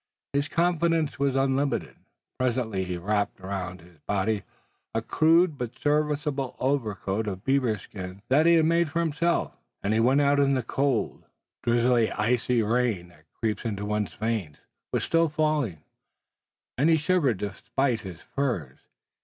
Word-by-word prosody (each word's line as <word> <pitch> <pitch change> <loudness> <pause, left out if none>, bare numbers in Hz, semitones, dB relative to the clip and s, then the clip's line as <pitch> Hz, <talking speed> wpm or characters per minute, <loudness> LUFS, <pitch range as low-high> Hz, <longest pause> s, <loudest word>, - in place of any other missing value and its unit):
His 140 +1 +1
confidence 165 -3 +1
was 140 -1 +1
unlimited. 135 +1 0 0.4
Presently 115 -6 0
he 90 -1 -3
wrapped 100 +4 -1
around 95 -1 -5
his 85 -2 -19
body 105 +1 0 0.5
a - - 0 0.2
rude 165 -1 +5
but 125 0 -5
serviceable 145 -2 0
overcoat 110 -6 -1
of 95 -1 -4
beaver 130 -5 +2
skin 95 0 -9
that 150 +5 +4
he 170 - +7
had 160 -1 +4
made 170 0 +2
for 165 +3 -1
himself, 170 +1 0 0.3
and 100 - +1
went 130 +4 +4
out. 145 0 +3
The 135 -2 +2
cold, 135 -2 -1 0.4
drizzling 120 -1 +3
icy 120 +2 +1
rain 110 -5 0
that 80 -2 -23
creeps 110 -2 -2
into 105 -3 -3
one's 105 0 -2
veins 110 -9 -2 0.3
was - - 0
still 165 -1 +2
falling, 150 - 0 1.0
and 150 +4 +4
he 165 - +5
shivered 150 - +2
despite 110 +5 -1
his 90 -3 -9
furs. 105 - -3
125 Hz, 145 wpm, -26 LUFS, 105-145 Hz, 1.0 s, he